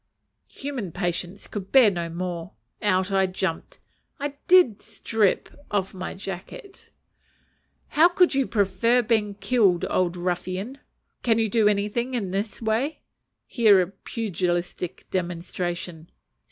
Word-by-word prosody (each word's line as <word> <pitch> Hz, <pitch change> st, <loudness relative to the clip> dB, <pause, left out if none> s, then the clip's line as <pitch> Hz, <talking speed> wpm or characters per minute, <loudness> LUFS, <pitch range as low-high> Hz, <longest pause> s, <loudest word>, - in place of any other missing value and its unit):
Human 265 Hz, -, -5 dB
patience 175 Hz, +2 st, -3 dB
could 195 Hz, -2 st, -7 dB
bear 255 Hz, -6 st, +7 dB
no 170 Hz, -2 st, -3 dB
more. 170 Hz, -2 st, -5 dB, 0.3 s
Out 190 Hz, -1 st, +1 dB
I 190 Hz, -1 st, +3 dB
jumped. 185 Hz, -2 st, -3 dB, 0.4 s
I 285 Hz, 0 st, -3 dB
did 350 Hz, -, +5 dB
"strip." 215 Hz, -4 st, 0 dB, 0.2 s
Off 195 Hz, -2 st, -1 dB
came 185 Hz, -, -12 dB
my -, -, -4 dB
jacket. 195 Hz, -, -9 dB, 1.0 s
"How 335 Hz, +4 st, +5 dB
would 360 Hz, -4 st, +5 dB
you 270 Hz, -1 st, +1 dB
prefer 220 Hz, +4 st, +2 dB
being 215 Hz, -3 st, +1 dB
killed, 200 Hz, -3 st, +2 dB
old 180 Hz, -1 st, +1 dB
ruffian? 185 Hz, +8 st, -3 dB, 0.4 s
can 225 Hz, -2 st, +2 dB
you 225 Hz, -1 st, +2 dB
do 215 Hz, 0 st, +3 dB
anything 210 Hz, +5 st, 0 dB
in 200 Hz, -6 st, -2 dB
this 205 Hz, +4 st, -3 dB
way?" 230 Hz, +8 st, -1 dB, 0.4 s
(Here 215 Hz, -6 st, +5 dB
a 180 Hz, 0 st, 0 dB
pugilistic 180 Hz, -4 st, -3 dB
demonstration.) 175 Hz, -1 st, -4 dB
195 Hz, 125 wpm, -25 LUFS, 180-230 Hz, 1.0 s, bear